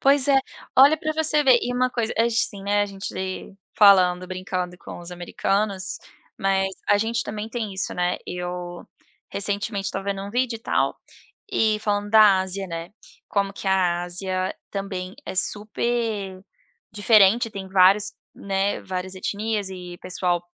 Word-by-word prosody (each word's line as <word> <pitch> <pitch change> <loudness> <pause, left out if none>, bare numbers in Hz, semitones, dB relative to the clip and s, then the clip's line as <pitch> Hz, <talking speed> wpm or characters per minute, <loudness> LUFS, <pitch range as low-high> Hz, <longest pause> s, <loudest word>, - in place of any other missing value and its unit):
Pois 275 0 +5
é. 275 -1 +6 0.4
Olha 280 +4 +8
para 310 0 -2
você 310 -1 +2
ver, 260 -4 +6
e 245 - -2
uma 255 0 +1
coisa 230 -3 -1
acho, 230 - +4 0.2
assim, 200 -3 -8
né, 205 +1 +2
a 205 - -1
gente 195 0 -7 0.6
falando, 185 -3 +6
brincando 185 -1 -4
com - - -9
os 175 0 -9
americanos, 195 +2 -2 0.4
mas 195 0 +1 0.2
a 205 - +6
gente 230 +2 0
também 210 +1 -5
tem 225 -3 -4
isso, 190 - -2
né, 180 0 0
eu 180 0 -5 0.5
recentemente 200 0 -2
estava 195 -1 -3
vendo 195 -1 -2
um 200 - -6
vídeo 250 +1 0
e - - -14
tal, - - 0 0.5
e 215 -1 +2
falando 205 -1 -1
da 210 -3 +7
Ásia, 190 +1 -3
né, 165 +1 -6 0.4
como 200 -1 0
que 200 - -9
a 180 -2 +2
Ásia 185 +1 -3 0.2
também 190 -2 -5
é - - -5
super 210 -1 -2 0.5
diferente, 215 +2 +4
tem 195 -2 -7
vários 195 +2 +4 0.2
né, 195 0 -1
várias 185 0 -5
etnias 205 +1 -2
e 180 -2 -8
pessoal 180 -1 -1
200 Hz, 160 wpm, -24 LUFS, 185-220 Hz, 0.6 s, Olha